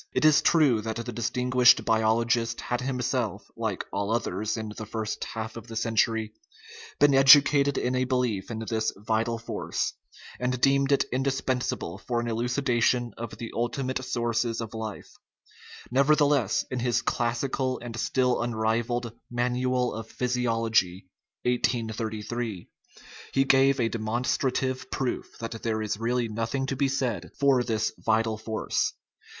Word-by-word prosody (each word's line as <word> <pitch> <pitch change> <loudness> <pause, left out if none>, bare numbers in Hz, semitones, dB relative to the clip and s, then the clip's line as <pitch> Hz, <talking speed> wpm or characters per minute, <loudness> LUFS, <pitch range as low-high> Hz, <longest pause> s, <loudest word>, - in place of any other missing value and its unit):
It - - +2
is 155 -1 +6
true 145 -9 +4
that 110 +1 -4
the 115 +1 -4
distinguished 125 +2 +3
biologist 115 +1 +1
had 125 +1 -2
him 130 0 -2
self - - -2
(like - - -3
all 100 0 -1
others 110 -1 -1
in 110 -1 -5
the 110 - -7
first 110 0 -3
half 110 0 -6
of 115 0 -9
the 115 - -8
century) 110 -1 +1 0.7
been 145 -1 +5
educated 140 +1 +6
in 125 - 0
a 130 0 +1
belief 125 -7 -1
in 115 -1 -4
this 110 -1 0
vital 110 +2 -1
force, 115 - -3 0.5
and 125 0 -1
deemed 140 +1 +3
it 140 - +3
indispensable 130 -8 -1
for 120 +2 -2
an 120 - -3
elucidation 120 0 +1
of 115 -1 -7
the 115 - -6
ulti 120 +3 -1
mate 130 0 -2
sources 120 -2 -1
of 115 -1 -5
life; 110 -2 -6 0.8
nevertheless, 140 -4 +3
in 130 - -2
his 120 -1 +1
classical 130 +2 -1
and 120 -1 -8
still 125 -2 +1
unrivalled 120 0 -1 0.2
Manual 125 +1 0
of 110 0 -7
Physiology 115 -7 0 0.3
(1833) 115 -3 -2 0.7
he 135 - +4
gave 135 0 +4
a 115 - +2
demonstrative 130 +3 -1
proof 130 -2 -3
that 115 -1 -6
there 110 -1 -1
is 105 -1 -3
really 120 +1 0
nothing 115 +5 -2
to 135 - -2
be 140 +1 +1
said 120 - -2
for 135 -3 +4
this 110 -3 -1
vital 110 0 +1
force. 110 0 -1
120 Hz, 145 wpm, -27 LUFS, 110-130 Hz, 0.8 s, is